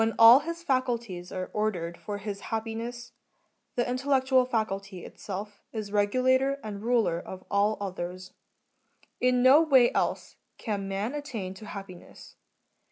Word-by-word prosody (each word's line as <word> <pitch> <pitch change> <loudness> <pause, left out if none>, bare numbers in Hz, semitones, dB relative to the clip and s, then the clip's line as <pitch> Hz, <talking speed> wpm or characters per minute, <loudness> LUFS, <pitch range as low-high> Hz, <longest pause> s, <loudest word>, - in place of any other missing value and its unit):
i 230 +3 +10
his 335 +1 -5
faculties 235 - -1
are 185 -1 -5
ordered 180 -6 -1
for 205 +3 -6
his 205 0 -5
happiness, 230 +2 -4 0.6
the 240 - +1
intellectual 260 0 +2
faculty 200 -6 -3
itself 205 +1 -7
is 215 -3 -5
regulator 255 +6 +2
and 205 -2 -6
ruler 225 -7 +1
of 185 +1 -9
all 205 +2 +2
others; 185 -2 -6 0.9
in 250 0 +3
no 270 +5 +8
way 265 -7 +5
else - - -1 0.2
can 200 -4 -3
man 200 +6 -2
attain 240 -11 -5
to 210 +3 -11
happiness. 195 -4 -10
215 Hz, 130 wpm, -28 LUFS, 195-250 Hz, 0.9 s, i